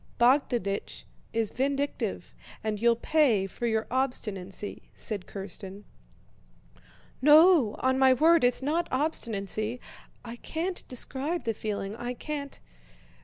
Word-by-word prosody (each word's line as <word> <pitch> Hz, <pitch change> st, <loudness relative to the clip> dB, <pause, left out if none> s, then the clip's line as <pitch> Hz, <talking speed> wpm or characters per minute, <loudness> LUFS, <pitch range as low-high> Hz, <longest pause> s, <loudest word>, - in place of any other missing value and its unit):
Bogdánich 240 Hz, -5 st, +1 dB, 0.3 s
is 225 Hz, -2 st, -1 dB
vindictive 280 Hz, +2 st, -2 dB, 0.3 s
and 215 Hz, -1 st, -2 dB
you'll 235 Hz, 0 st, +4 dB
pay 240 Hz, -6 st, +2 dB
for 215 Hz, +5 st, -4 dB
your 220 Hz, -1 st, 0 dB
obstinacy," 210 Hz, -7 st, -3 dB
said 205 Hz, -4 st, -3 dB
Kírsten. 195 Hz, 0 st, -7 dB, 1.4 s
"No, 300 Hz, -, +6 dB
on 260 Hz, 0 st, +2 dB
my 265 Hz, -1 st, +6 dB
word 320 Hz, +5 st, +5 dB
it's 245 Hz, +1 st, +2 dB
not 330 Hz, +5 st, 0 dB
obstinacy! 230 Hz, -, -2 dB, 0.5 s
I 235 Hz, 0 st, -7 dB
can't 345 Hz, +8 st, -3 dB
describe 275 Hz, +6 st, -2 dB
the 230 Hz, -, -1 dB
feeling. 205 Hz, -1 st, -4 dB
I 245 Hz, +1 st, -4 dB
can't..." 285 Hz, +1 st, -6 dB
245 Hz, 115 wpm, -28 LUFS, 215-285 Hz, 1.4 s, No